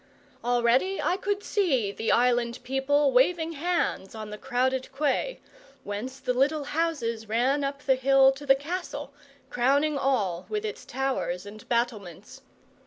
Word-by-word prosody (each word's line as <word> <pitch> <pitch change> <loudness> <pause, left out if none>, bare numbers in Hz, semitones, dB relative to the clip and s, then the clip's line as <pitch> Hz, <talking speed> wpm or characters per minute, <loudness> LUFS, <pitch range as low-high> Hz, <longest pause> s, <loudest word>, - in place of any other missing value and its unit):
Already 245 +10 +2
I 355 - +1
could 405 +1 -2
see 270 - +1
the 220 +2 -1
island 240 0 +2
people 270 +2 +2
waving 320 +6 +3
hands 330 - -1
on 215 -1 -7
the 210 - -6
crowded 260 0 0
quay, 290 - -1 0.4
whence 220 +6 -5
the 255 -1 -1
little 285 +4 +1
houses 275 -9 -2
ran 260 +6 +1
up 280 +1 -4
the 265 - +4
hill 270 +1 +5
to 285 +2 -9
the 270 - +7
castle, 290 -1 -5 0.4
crowning 280 +4 +2
all 200 -11 0
with 425 0 -2
its 425 - -6
towers 255 -9 -2
and 210 +1 -12
battlements. 230 -8 -3
265 Hz, 145 wpm, -27 LUFS, 235-290 Hz, 0.4 s, the